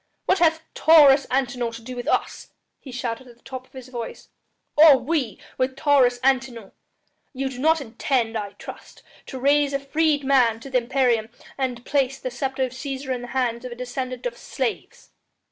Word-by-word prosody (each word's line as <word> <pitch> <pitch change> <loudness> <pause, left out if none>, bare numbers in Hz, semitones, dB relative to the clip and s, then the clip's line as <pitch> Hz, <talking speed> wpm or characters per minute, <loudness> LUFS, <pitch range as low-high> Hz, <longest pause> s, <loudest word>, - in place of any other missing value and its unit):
"What 380 - +2
hath 325 -1 +3
Taurus 290 -4 +6
Antinor 250 -2 -1
to 230 - -9
do 255 +2 -7
with 245 - -6
us?" - - -1 0.3
he 270 - -11
shouted 250 0 -4
at 240 -1 -16
the - - -32
top 260 -1 -8
of - - -35
his 260 -1 -10
voice, 240 -2 -7 0.5
"or 300 -2 +8
we 255 - -2 0.2
with 260 0 0
Taurus 270 -4 +3
Antinor? 255 -6 0 0.6
Ye 270 0 -2
do 255 -1 -9
not 320 +4 +3
intend, 235 -1 -1
I 205 -2 -4
trust, - - -12 0.2
to 265 - -7
raise 285 +1 +3
a 275 - 0
freedman 275 -5 +2
to 275 - -10
the 255 - +3
imperium 240 -3 +1 0.3
and 250 -3 -3
place 270 -2 0
the 255 - -5
sceptre 265 +2 -2
of 255 - -2
Cæsar 265 0 -4
in 250 - -4
the 245 - -7
hands 235 -2 0
of 250 - -7
a - - -6
descendant 250 0 -5
of 240 -1 -2
slaves!" 260 -3 -5
260 Hz, 185 wpm, -23 LUFS, 245-275 Hz, 0.6 s, or